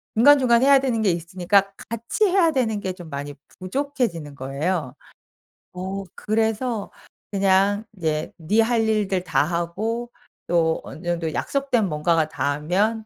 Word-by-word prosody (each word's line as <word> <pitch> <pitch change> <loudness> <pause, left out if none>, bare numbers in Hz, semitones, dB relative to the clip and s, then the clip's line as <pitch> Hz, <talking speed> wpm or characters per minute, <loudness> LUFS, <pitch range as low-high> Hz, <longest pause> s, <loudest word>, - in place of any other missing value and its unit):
중간중간 245 -1 +6
해야 275 0 +7
되는 250 -4 0
게 205 -4 +3
있으니까 185 +4 +1 0.2
같이 230 - 0
해야 365 -4 +3
되는 230 -7 0
게 190 - -2
좀 175 -3 -11
많이 145 0 -5 0.3
부족해지는 190 - -2
거예요. 140 +2 -2 0.8
어 190 +2 -4
그래서 220 +1 -1 0.4
그냥 200 +1 +2
이제 155 -4 -2
네 175 +7 0
할 230 0 +2
일들 195 -4 0
다하고 180 +9 -1 0.4
또 165 -2 +2
어느 165 - -10
정도 170 -2 -1
약속된 270 -6 0
뭔가가 160 0 +1
다 145 -2 -1
하면 200 +9 0
195 Hz, 275 characters per minute, -23 LUFS, 170-230 Hz, 0.8 s, 해야